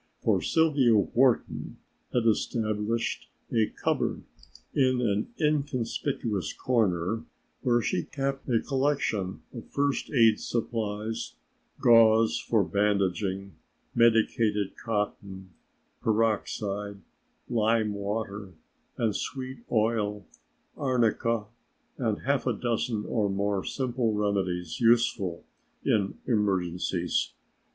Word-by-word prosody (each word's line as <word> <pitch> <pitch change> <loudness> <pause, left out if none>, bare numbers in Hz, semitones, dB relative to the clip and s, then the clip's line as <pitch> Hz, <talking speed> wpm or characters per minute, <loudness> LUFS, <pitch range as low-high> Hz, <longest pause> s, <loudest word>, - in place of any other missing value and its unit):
For - - +3
Sylvia 145 -8 +3
Wharton 120 +5 +1 0.3
had 120 -2 +1
established 110 0 0 0.2
a 110 -2 +3
cupboard - - -1 0.5
in 130 -2 +3
an 105 -4 0
inconspicuous 135 - -1
corner 110 -2 0 0.4
where 120 -3 +2
she 90 - 0
kept 135 -1 -3
a 115 -2 +3
collection 135 -9 -1
of - - -9
first 140 -1 0
aid 115 -5 +4
supplies: 110 -2 -3 0.4
gauze 115 -1 +5
for 110 -3 +2
bandaging, 100 +1 0 0.4
medicated 110 -3 +2
cotton, 100 -4 -4 0.5
peroxide, 105 -2 -1 0.5
lime 110 -2 +1
water 100 -2 -4 0.4
and 110 -3 0
sweet 130 -1 -4
oil, 105 -3 +1 0.5
arnica, 115 -4 +1 0.5
and 110 -5 -1
half 140 -1 0
a 125 - +2
dozen 115 -1 -1
or 105 -3 0
more 100 0 0
simple 125 -4 -1
remedies 95 -5 -1
useful 115 -7 +2 0.4
in 100 -3 +1
emergencies. 90 -5 0
110 Hz, 95 wpm, -28 LUFS, 100-120 Hz, 0.5 s, gauze